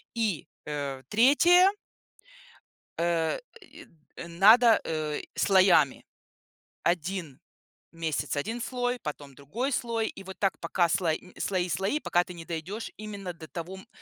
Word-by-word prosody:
И, 215 Hz, -9 st, -1 dB, 0.2 s
э, 140 Hz, -3 st, -4 dB
3 315 Hz, -, +6 dB, 1.3 s
э, 170 Hz, -1 st, +1 dB, 0.2 s
и 335 Hz, -3 st, -14 dB, 0.4 s
надо, 220 Hz, +7 st, +6 dB
э, 155 Hz, -2 st, -3 dB
слоями: 185 Hz, -8 st, +4 dB, 0.8 s
1 170 Hz, -4 st, -2 dB, 0.5 s
месяц- 160 Hz, -3 st, -2 dB
1 225 Hz, +11 st, -3 dB
слой, 245 Hz, -1 st, -2 dB
потом 145 Hz, -2 st, -7 dB
другой 225 Hz, -, -3 dB
слой, 230 Hz, -2 st, -1 dB
и 195 Hz, -, -10 dB
вот 190 Hz, 0 st, -9 dB
так, 195 Hz, -2 st, 0 dB
пока 170 Hz, +1 st, +1 dB
сло 170 Hz, 0 st, +1 dB
нь 180 Hz, +3 st, -11 dB
слои 185 Hz, -2 st, -1 dB
слои, 195 Hz, -, 0 dB
пока 175 Hz, -9 st, +1 dB
ты 180 Hz, -, -10 dB
не 165 Hz, -, -9 dB
дойдешь 175 Hz, +7 st, -5 dB
именно 205 Hz, -3 st, -6 dB
до 165 Hz, -2 st, -12 dB
того, 175 Hz, +2 st, -6 dB
м, 190 Hz, +4 st, -14 dB
185 Hz, 135 wpm, -28 LUFS, 160-225 Hz, 1.3 s, 3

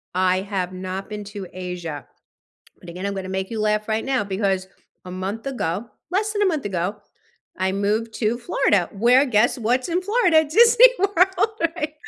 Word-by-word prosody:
I 185 Hz, 0 st, +2 dB
have 190 Hz, -2 st, -3 dB
not 185 Hz, +2 st, -6 dB
been 210 Hz, -1 st, -6 dB
to 200 Hz, -2 st, -8 dB
Asia, 180 Hz, -5 st, -6 dB, 0.7 s
but 175 Hz, -, -14 dB
again, 180 Hz, +3 st, -5 dB
I'm 200 Hz, -, -2 dB
gonna 190 Hz, -1 st, -5 dB
make 190 Hz, 0 st, -3 dB
you 225 Hz, -2 st, -3 dB
laugh 215 Hz, 0 st, 0 dB
right 220 Hz, 0 st, -1 dB
now, 265 Hz, -5 st, 0 dB
because 195 Hz, -1 st, -1 dB, 0.4 s
a 180 Hz, -, -9 dB
month 190 Hz, +6 st, -5 dB
ago, 225 Hz, -6 st, -3 dB, 0.2 s
less 420 Hz, +4 st, 0 dB
than 415 Hz, -1 st, -1 dB
a -, -, +4 dB
month 315 Hz, -6 st, -1 dB
ago, 190 Hz, 0 st, -2 dB, 0.6 s
I 190 Hz, 0 st, 0 dB
moved 210 Hz, +3 st, -1 dB
to 225 Hz, +1 st, -1 dB
Florida, 205 Hz, -6 st, +1 dB
where 240 Hz, +6 st, +4 dB
guess 240 Hz, 0 st, +2 dB
what's 245 Hz, +3 st, 0 dB
in 350 Hz, +1 st, 0 dB
Florida? 370 Hz, -7 st, +3 dB
Disney 465 Hz, +9 st, +7 dB
World, 380 Hz, +2 st, +2 dB, 0.2 s
right? 305 Hz, -2 st, -3 dB
210 Hz, 180 wpm, -22 LUFS, 190-290 Hz, 0.7 s, Disney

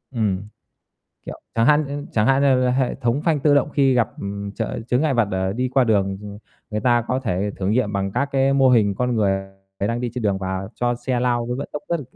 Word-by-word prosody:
ừm, 100 Hz, -5 st, 0 dB, 0.9 s
kiểu -, -, -7 dB
chẳng 115 Hz, 0 st, +2 dB
hạn 150 Hz, +2 st, +5 dB
nh 145 Hz, +1 st, -5 dB
chẳng 105 Hz, -1 st, +2 dB
hạn 135 Hz, +1 st, +3 dB
như, 130 Hz, -2 st, +3 dB
a, -, -, +2 dB
hệ 130 Hz, 0 st, 0 dB
thống 125 Hz, +2 st, -1 dB
phanh 155 Hz, -4 st, +1 dB
tự 145 Hz, 0 st, +4 dB
động 145 Hz, +1 st, +2 dB
khi 135 Hz, -3 st, +3 dB
gặp, 120 Hz, -2 st, +2 dB
ừm, 100 Hz, 0 st, -5 dB
ch -, -, -18 dB, 0.3 s
chướng 125 Hz, +1 st, +2 dB
ngại 150 Hz, -3 st, +1 dB
vật 120 Hz, -2 st, +3 dB
để 95 Hz, 0 st, -1 dB
đi 125 Hz, +4 st, -1 dB
qua 130 Hz, 0 st, +3 dB
đường, 100 Hz, -3 st, +1 dB
ừ, 105 Hz, 0 st, -8 dB, 0.3 s
người 105 Hz, 0 st, -2 dB
ta 120 Hz, -1 st, +3 dB
có 130 Hz, +1 st, 0 dB
thể 105 Hz, -4 st, -1 dB
thử 95 Hz, -, -3 dB
nghiệm 110 Hz, -1 st, +1 dB
bằng 100 Hz, -1 st, -2 dB
các 140 Hz, -, 0 dB
cái 135 Hz, 0 st, +3 dB
mô 135 Hz, -1 st, +4 dB
hình 105 Hz, -5 st, +3 dB
con 125 Hz, +4 st, -1 dB
người 95 Hz, -3 st, +1 dB, 0.4 s
đang 115 Hz, +4 st, -1 dB
đi 120 Hz, -1 st, -2 dB
trên 125 Hz, -, -3 dB
đường 100 Hz, -2 st, +1 dB
và 95 Hz, 0 st, -4 dB
cho 120 Hz, 0 st, 0 dB
xe 120 Hz, +1 st, -2 dB
lao 120 Hz, -1 st, 0 dB
với 125 Hz, +1 st, -3 dB
vận 140 Hz, -, -5 dB
tốc 150 Hz, -, -5 dB
rất 170 Hz, -2 st, 0 dB
l -, -, -6 dB
120 Hz, 255 wpm, -22 LUFS, 100-135 Hz, 0.9 s, hạn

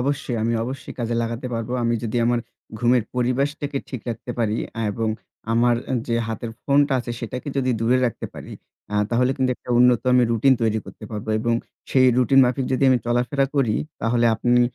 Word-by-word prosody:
অবশ্যই। 135 Hz, -2 st, -1 dB
আমি 115 Hz, +1 st, +1 dB
অবশ্যই 130 Hz, +2 st, -6 dB
কাজে 120 Hz, -1 st, -1 dB
লাগাতে 115 Hz, +2 st, -4 dB
পারবো। 115 Hz, +1 st, -3 dB
আমি 115 Hz, 0 st, +1 dB
যদি 115 Hz, 0 st, -2 dB
আমার 120 Hz, 0 st, +2 dB, 0.4 s
ঘুমের 120 Hz, +1 st, +3 dB
পরিবেশটাকে 140 Hz, +3 st, -1 dB
ঠিক 130 Hz, -, -5 dB
রাখতে 120 Hz, +1 st, -5 dB
পারি 110 Hz, -2 st, +1 dB, 0.2 s
অ্যা 115 Hz, -, -3 dB
এবং 110 Hz, +2 st, -1 dB, 0.4 s
আমার 120 Hz, +1 st, +3 dB, 0.3 s
যে 115 Hz, -, +1 dB
হাতের 115 Hz, +1 st, -4 dB
ফোনটা 140 Hz, 0 st, +3 dB
আছে 120 Hz, -, -6 dB
সেটাকে 125 Hz, +4 st, -5 dB
যদি 130 Hz, -1 st, +1 dB
দূরে 120 Hz, +3 st, +3 dB
রাখতে 115 Hz, -, -4 dB
পারি, -, -, -9 dB, 0.4 s
আ -, -, -2 dB, 0.2 s
তাহলে 125 Hz, +2 st, +2 dB
কিন্তু 130 Hz, -2 st, +1 dB
একটা -, -, -11 dB
উন্নত 125 Hz, -1 st, +5 dB
আমি 125 Hz, -, +5 dB
routine 130 Hz, +3 st, +4 dB
তৈরি 110 Hz, -1 st, +2 dB
করতে -, -, -11 dB
পারবো 110 Hz, 0 st, -6 dB
এবং 120 Hz, +1 st, +1 dB, 0.4 s
সেই 130 Hz, -1 st, +5 dB
routine 130 Hz, +2 st, +5 dB
মাফিক 125 Hz, +1 st, 0 dB
যদি 130 Hz, -, 0 dB
আমি 130 Hz, -, +4 dB
চলাফেরা 125 Hz, +3 st, +1 dB
করি, 120 Hz, -6 st, +2 dB, 0.3 s
তাহলে 120 Hz, +1 st, +2 dB
আপনি 120 Hz, +2 st, +2 dB
120 Hz, 185 wpm, -23 LUFS, 115-130 Hz, 0.4 s, উন্নত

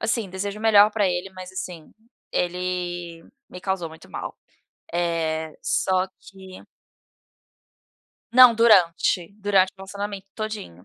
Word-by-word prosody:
Assim, 215 Hz, -3 st, -1 dB
desejo 200 Hz, +2 st, -4 dB
o -, -, -10 dB
melhor 210 Hz, -1 st, +6 dB
para 205 Hz, -4 st, +2 dB
ele, 180 Hz, +2 st, -2 dB
mas, 185 Hz, -1 st, -10 dB
assim, 180 Hz, -4 st, -7 dB, 0.4 s
ele 175 Hz, -1 st, -3 dB, 0.3 s
me 180 Hz, -, -9 dB
causou 190 Hz, -3 st, -2 dB
muito 160 Hz, 0 st, -15 dB
mal. -, -, -6 dB, 0.6 s
Eh, 160 Hz, -2 st, -1 dB
só 185 Hz, +3 st, +1 dB
que 190 Hz, -1 st, -13 dB, 1.7 s
Não, 250 Hz, -2 st, +9 dB
durante, 185 Hz, -5 st, +3 dB
durante 195 Hz, -2 st, +3 dB
o -, -, -53 dB
relacionamento 200 Hz, 0 st, -6 dB
todinho. 215 Hz, -, -6 dB
185 Hz, 120 wpm, -24 LUFS, 175-205 Hz, 1.7 s, Não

